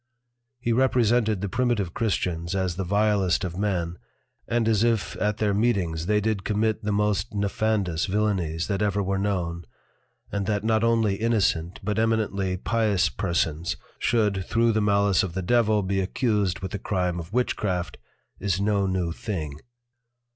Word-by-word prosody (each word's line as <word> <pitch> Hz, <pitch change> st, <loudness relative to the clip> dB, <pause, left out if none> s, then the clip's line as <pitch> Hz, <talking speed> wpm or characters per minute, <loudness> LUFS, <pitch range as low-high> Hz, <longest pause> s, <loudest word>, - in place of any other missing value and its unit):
He 120 Hz, -1 st, 0 dB
represented 115 Hz, -4 st, +2 dB
the 100 Hz, -, -1 dB
Primitive 105 Hz, -5 st, 0 dB
Christians 90 Hz, -6 st, -1 dB
as 95 Hz, -2 st, -1 dB
the 95 Hz, -, -2 dB
vilest 100 Hz, -2 st, +2 dB
of 90 Hz, 0 st, -4 dB
men, 90 Hz, -4 st, -1 dB, 0.5 s
and 115 Hz, -1 st, +1 dB
as 110 Hz, -1 st, +3 dB
if 115 Hz, -3 st, +1 dB
at 105 Hz, 0 st, 0 dB
their 105 Hz, -2 st, +1 dB
Meetings 95 Hz, -7 st, 0 dB
they 105 Hz, 0 st, +3 dB
did 105 Hz, -2 st, -1 dB
commit 110 Hz, +1 st, 0 dB
the 105 Hz, -, -1 dB
most 105 Hz, -2 st, 0 dB
nefandous 100 Hz, -3 st, 0 dB
Villanies 95 Hz, -5 st, 0 dB
that 100 Hz, -1 st, -2 dB
ever 100 Hz, -1 st, +1 dB
were 95 Hz, 0 st, -1 dB
known; 90 Hz, -4 st, -2 dB, 0.7 s
and 100 Hz, -1 st, -2 dB
that 105 Hz, -1 st, 0 dB
not 110 Hz, 0 st, +2 dB
only 115 Hz, -4 st, +2 dB
Innocent, 95 Hz, -6 st, 0 dB
but 105 Hz, +2 st, -1 dB
Eminently 105 Hz, -4 st, 0 dB
Pious 105 Hz, -4 st, +1 dB
Persons 85 Hz, -4 st, -1 dB, 0.2 s
should 105 Hz, -5 st, +1 dB
thro' 115 Hz, +4 st, +2 dB
the 110 Hz, 0 st, +1 dB
malice 100 Hz, -2 st, +3 dB
of 90 Hz, -2 st, -4 dB
the 95 Hz, -, -2 dB
Devil 110 Hz, 0 st, +3 dB
be 95 Hz, +1 st, 0 dB
accused 100 Hz, -2 st, 0 dB
with 95 Hz, -1 st, -4 dB
the 105 Hz, -, -4 dB
Crime 90 Hz, -3 st, -1 dB
of 85 Hz, +1 st, -8 dB
Witchcraft, 100 Hz, -7 st, -1 dB, 0.4 s
is 95 Hz, -2 st, 0 dB
no 100 Hz, -1 st, +1 dB
new 90 Hz, -3 st, -1 dB
thing. 80 Hz, -6 st, -5 dB
100 Hz, 160 wpm, -25 LUFS, 90-110 Hz, 0.7 s, as